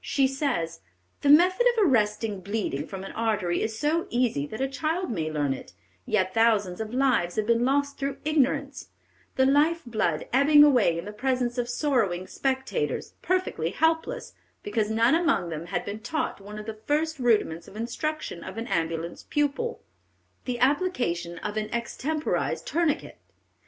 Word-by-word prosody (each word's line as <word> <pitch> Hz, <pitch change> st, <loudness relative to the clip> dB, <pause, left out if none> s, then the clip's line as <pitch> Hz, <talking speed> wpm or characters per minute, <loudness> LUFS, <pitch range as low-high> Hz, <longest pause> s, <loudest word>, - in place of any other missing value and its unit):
She 275 Hz, -, +2 dB
says: 265 Hz, -, -1 dB, 0.4 s
"The 285 Hz, -, +2 dB
method 365 Hz, +10 st, +6 dB
of 425 Hz, -, +5 dB
arresting 210 Hz, -, +1 dB
bleeding 185 Hz, -7 st, -3 dB
from 190 Hz, -1 st, -7 dB
an 195 Hz, -, -7 dB
artery 210 Hz, -6 st, 0 dB
is 220 Hz, 0 st, -2 dB
so 315 Hz, +6 st, 0 dB
easy 235 Hz, -, 0 dB
that 220 Hz, -, -7 dB
a 270 Hz, -, +1 dB
child 315 Hz, +5 st, -2 dB
may 160 Hz, -7 st, -2 dB
learn 145 Hz, -3 st, 0 dB
it; 130 Hz, -, -10 dB, 0.3 s
yet 190 Hz, -3 st, +1 dB
thousands 215 Hz, -5 st, +2 dB
of 220 Hz, 0 st, -5 dB
lives 250 Hz, -9 st, +1 dB
have 215 Hz, -, 0 dB
been 235 Hz, +1 st, +2 dB
lost 280 Hz, +1 st, 0 dB
through 275 Hz, 0 st, -2 dB
ignorance, 280 Hz, -2 st, 0 dB, 0.5 s
the 265 Hz, -, +4 dB
life 300 Hz, +5 st, +3 dB
blood 215 Hz, -10 st, -1 dB
ebbing 290 Hz, +3 st, +7 dB
away 245 Hz, -, +4 dB
in 170 Hz, -, -5 dB
the 210 Hz, -, -6 dB
presence 250 Hz, +2 st, -1 dB
of 240 Hz, 0 st, -1 dB
sorrowing 235 Hz, -, 0 dB
spectators, 265 Hz, -, -2 dB
perfectly 365 Hz, -, 0 dB
helpless, 325 Hz, -, 0 dB, 0.3 s
because 210 Hz, 0 st, -1 dB
none 230 Hz, +4 st, +3 dB
among 320 Hz, -, +2 dB
them 165 Hz, +1 st, -5 dB
had 195 Hz, -, -2 dB
been 205 Hz, +2 st, -5 dB
taught 310 Hz, -2 st, -3 dB
one 205 Hz, +2 st, -9 dB
of 210 Hz, -, -7 dB
the 215 Hz, -1 st, -7 dB
first 310 Hz, +1 st, 0 dB
rudiments 210 Hz, -9 st, +1 dB
of -, -, -13 dB
instruction 235 Hz, -, -4 dB
of -, -, -8 dB
an 225 Hz, -, -3 dB
ambulance 165 Hz, 0 st, -2 dB
pupil, 295 Hz, +12 st, -1 dB, 0.6 s
the 250 Hz, -2 st, -2 dB
application 250 Hz, -, 0 dB
of 210 Hz, +1 st, -3 dB
an 215 Hz, 0 st, -2 dB
extemporized 285 Hz, +6 st, -2 dB
tourniquet. 330 Hz, -3 st, -1 dB
240 Hz, 165 wpm, -26 LUFS, 200-290 Hz, 0.6 s, ebbing